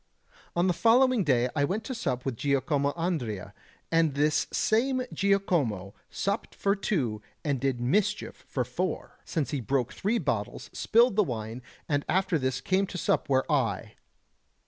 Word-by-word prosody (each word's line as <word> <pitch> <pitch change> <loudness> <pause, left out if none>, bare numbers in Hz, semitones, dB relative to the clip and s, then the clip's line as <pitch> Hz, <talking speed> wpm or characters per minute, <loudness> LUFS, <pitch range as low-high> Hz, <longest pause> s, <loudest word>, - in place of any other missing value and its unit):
On 175 +1 +3
the 180 - +3
following 240 +3 +4
day 125 -5 +3
I 145 - +2
went 200 +10 -1
to 260 - -4
sup 130 - -2
with 135 -3 -1
Giacomo 140 +2 +1
Andrea, 150 - -3 0.4
and 165 -3 +3
this 150 +1 +2
same 255 +4 +2
Giacomo 165 - +1 0.2
supped 200 +3 -2
for 200 0 +1
two 130 - -1 0.2
and 140 -3 0
did 135 -1 0
mischief 205 - 0
for - - -1
four, - - -3
since 155 -5 -2
he 145 - -1
broke 125 +1 0
three 215 +5 0
bottles, 115 - -3
spilled 235 -1 +3
the 210 - +6
wine, 115 - -5 0.3
and 145 -2 +1
after 185 -3 +2
this 130 -1 -1
came 190 +6 +1
to 185 - -6
sup - - 0
where 130 -1 +3
I... 115 -6 0
150 Hz, 160 wpm, -28 LUFS, 130-200 Hz, 0.4 s, the